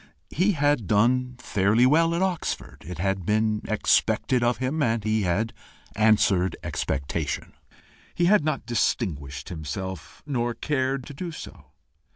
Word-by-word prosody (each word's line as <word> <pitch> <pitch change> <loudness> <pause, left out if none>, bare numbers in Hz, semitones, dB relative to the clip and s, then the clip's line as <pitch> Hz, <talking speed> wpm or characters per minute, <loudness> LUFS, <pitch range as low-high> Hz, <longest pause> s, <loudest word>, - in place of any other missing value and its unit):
He 190 +6 +2
had 145 - +1
done 125 +5 +2
fairly 110 0 +2
well 165 +5 +4
at 175 - +1
Oxford: 185 -3 -3
it 90 -2 -6
had 95 +2 -1
been 105 +2 +1
expected 120 +3 +2
of 120 0 +2
him, 130 +5 -1
and 115 -5 +1
he 110 0 +1
had 100 +5 0 0.4
answered 105 -4 +3
expectation; 70 +3 -3 0.6
he 175 - +2
had 200 -2 +5
not 150 -5 -1
distinguished 75 - -2
himself, 85 +1 -6
nor 120 -5 -1
cared 135 -3 -1
to 145 - -9
do 170 +5 -5
so. 155 - -10
115 Hz, 140 wpm, -25 LUFS, 95-140 Hz, 0.6 s, had